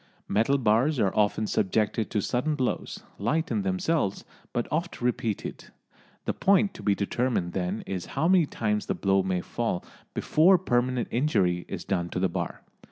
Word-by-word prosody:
Metal 115 +7 +2
bars 125 +4 +2
are 100 -4 +1
often 105 +1 +2
subjected 105 +2 0
to 105 - 0
sudden 150 +5 0
blows, 130 -3 -2 0.2
light 160 - 0
in 210 - +1
themselves 170 - 0 0.3
but 120 - -1
oft 170 +3 -2
repeated. 120 -3 -2 0.6
The - - 0
point 200 +1 +3
to - - -10
be 100 0 +2
determined 100 -3 -1
then 95 +3 -2
is 95 -2 -4
how 155 +4 +3
many 180 -4 +5
times 105 -4 -1
the - - 0
blow 95 -1 +2
may 95 -1 -1
fall 115 -5 -2 0.3
before 180 +5 +5
permanent 125 -6 0
injury 100 - +1
is - - -6
done 85 -3 -1
to 90 - -3
the 95 0 +2
bar. - - -4
115 Hz, 165 wpm, -27 LUFS, 100-150 Hz, 0.6 s, many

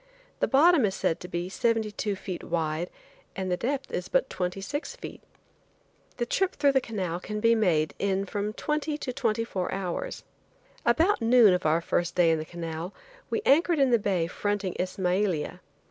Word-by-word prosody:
The - - +2
bottom 305 +1 +5
is 195 -2 -1
said 165 - 0
to 180 - -8
be 175 0 -3
seventy 225 +2 0
two 205 0 -2
feet 185 -2 -6
wide 165 0 -1 0.5
and 190 -1 -3
the - - +3
depth 270 +7 -3
is 180 - -3
but 265 0 +1
twenty 180 +1 -2
six 290 - -4
feet. - - -9 1.0
The 240 - 0
trip 385 +9 0
through 285 -1 +4
the 265 -1 +3
canal 185 -8 -3
can 210 +3 -5
be 230 +1 +4
made 175 -9 +2
in 195 0 0
from 205 +2 -3
twenty 300 +3 -2
to 255 -4 -4
twenty 225 -1 0
four 185 -5 -3
hours. 195 - -4 0.6
About 320 +8 +3
noon 230 -3 +6
of 180 -3 +1
our 160 +2 +3
first 175 +1 -1
day 175 -2 +5
in 160 - +1
the 155 - -4
canal 165 +1 -6 0.3
we 435 - -1
anchored 330 +4 +4
in 270 -3 +3
the 235 - +5
bay 190 -5 0
fronting 205 +2 -2
Ismailia. 185 -2 -1
200 Hz, 185 wpm, -27 LUFS, 180-250 Hz, 1.0 s, noon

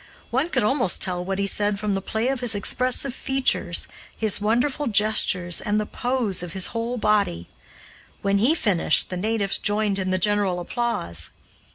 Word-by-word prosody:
One 270 +7 +1
could 260 -8 +1
almost 245 -4 +2
tell 180 -2 -1
what 190 +1 -3
he 200 - 0
said 205 0 0
from 210 -1 -1
the 195 - -1
play 220 +5 -1
of 270 -1 -1
his 240 -3 +1
expressive 255 +5 +2
features, 265 0 -1 0.3
his 215 -2 +2
wonderful 245 +7 0
gestures, 205 -5 +2
and 210 0 0
the 215 - -1
pose 240 -6 -1
of 175 -2 -7
his 190 -2 +2
whole 230 +2 -2
body. 205 - +1 0.8
When 200 0 +2
he 260 +10 +4
finished, 190 - +1
the - - -2
natives 205 0 0
joined 205 -1 0
in 185 -1 -2
the 185 - +1
general 200 -2 +1
applause. 170 - -2
210 Hz, 175 wpm, -23 LUFS, 195-240 Hz, 0.8 s, he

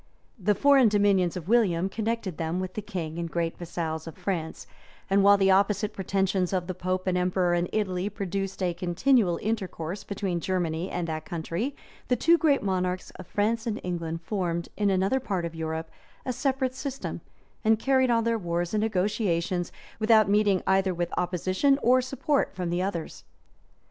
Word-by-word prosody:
The 205 +2 +2
foreign 275 0 +5
dominions 200 -4 +2
of 175 -2 -7
William 190 -6 +3
connected 215 -3 -3
them 165 +2 -1
with 185 0 -4
the 215 - -4
king 170 -5 -5
and 170 -1 -3
great 165 0 -1
vassals 165 -2 -4
of 165 - -9
France; 175 -4 -3 0.5
and 195 0 +4
while 200 0 +7
the 195 -1 +4
opposite 200 +2 +2
pretensions 190 -1 0
of 180 -2 0
the 185 - -4
pope 185 +1 -2
and 185 -1 +1
emperor 180 0 +1
in 175 0 0
Italy 190 -2 -1
produced 195 -1 -3
a 175 -1 +1
continual 180 +2 +2
intercourse 195 -4 -3
between 195 -3 -2
Germany 175 -1 -1
and 175 -1 -3
that 155 -1 -4
country, 175 - -3 0.3
the 250 - +3
two 335 +7 +4
great 285 -7 +3
monarchs 185 -2 -1
of 185 - -11
France 220 +3 0
and 220 -2 -2
England 165 -2 -3
formed, 170 -3 -2
in 205 -1 +1
another 195 +7 +2
part 195 -9 -2
of 170 - -5
Europe, 160 0 -4 0.3
a 255 - -1
separate 260 +1 0
system, 270 0 -5 0.4
and 220 0 +4
carried 260 +2 +2
on 230 -1 +3
their 230 0 +1
wars 175 -1 -2
and 210 - +2
negotiations, 185 -4 0 0.3
without 220 -2 +5
meeting 205 -2 +3
either 190 -1 +2
with 175 0 -2
opposition 185 - +1
or 255 +2 +5
support 270 +3 -1
from 180 -2 -3
the 175 +1 0
others. 175 - -4
190 Hz, 175 wpm, -27 LUFS, 175-215 Hz, 0.5 s, while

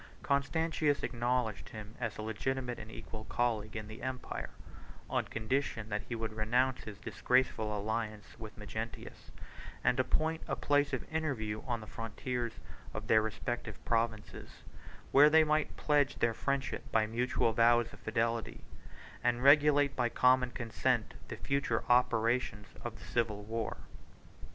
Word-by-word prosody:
Constantius 145 +1 +1
acknowledged 120 -3 -1
him 110 0 -9
as 115 -4 -3
a 110 - -4
legitimate 125 +3 -2
and 105 - -9
equal 110 0 -8
colleague 110 -3 -1
in 110 -1 -4
the 110 +1 -9
empire, 130 0 -4 0.6
on - - 0
condition 115 -1 -2
that 105 0 -1
he 120 - -2
would 110 -1 -3
renounce 125 +4 +1
his 105 -2 -7
disgraceful 110 -3 +1
alliance 110 0 -3
with 110 -1 -9
Magnentius, 110 +2 -7 0.5
and 125 - +3
appoint 160 +5 +1
a - - 0
place 145 0 +2
of 130 - -3
interview 115 -10 -1
on 120 -2 -1
the - - -8
frontiers 115 +2 -4 0.4
of - - -4
their 110 - +5
respective 110 0 -3
provinces; 115 -2 -2 0.5
where 145 +2 +8
they 160 +1 +7
might 155 0 0
pledge 145 -2 +2
their 120 -1 +1
friendship 140 +3 -2
by 110 -1 +3
mutual 115 0 +1
vows 120 +1 +4
of - - -12
fidelity, 115 0 -1 0.6
and 120 0 +1
regulate 145 0 +6
by 120 -2 +1
common 125 +1 +4
consent 120 0 -1
the - - -6
future 140 -5 0
operations 120 -3 +2 0.2
of 115 -2 -5
the 105 - -12
civil 110 -3 -1
war. 115 +1 -3
120 Hz, 145 wpm, -33 LUFS, 110-130 Hz, 0.6 s, where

